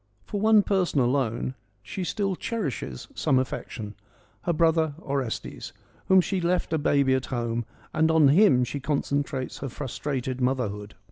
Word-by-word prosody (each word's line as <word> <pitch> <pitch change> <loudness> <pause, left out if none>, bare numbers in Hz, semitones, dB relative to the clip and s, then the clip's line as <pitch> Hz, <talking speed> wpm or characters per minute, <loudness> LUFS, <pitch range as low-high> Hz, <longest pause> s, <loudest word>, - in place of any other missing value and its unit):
For 205 - -3
one 215 -1 +6
person 185 -7 +1
alone 125 -1 0 0.3
she 185 - -5
still 195 +1 -1
cherishes 145 - -4
some 130 - +2
affection, 110 -4 -3 0.5
her 175 - +2
brother 160 -2 +2
Orestes, 135 -7 -4 0.3
whom 190 -1 +6
she 190 +2 -2
had 180 - -2
left 180 -1 0
a 160 - +2
baby 140 -2 +3
at 130 -1 0
home, 120 -2 -2 0.3
and 160 +1 +3
on 160 -3 +5
him 155 -5 +5
she 140 +3 -3
concentrates 140 -1 -2
her 135 - -4
frustrated 130 -1 -4
motherhood 110 -5 -1
140 Hz, 150 wpm, -26 LUFS, 125-170 Hz, 0.5 s, one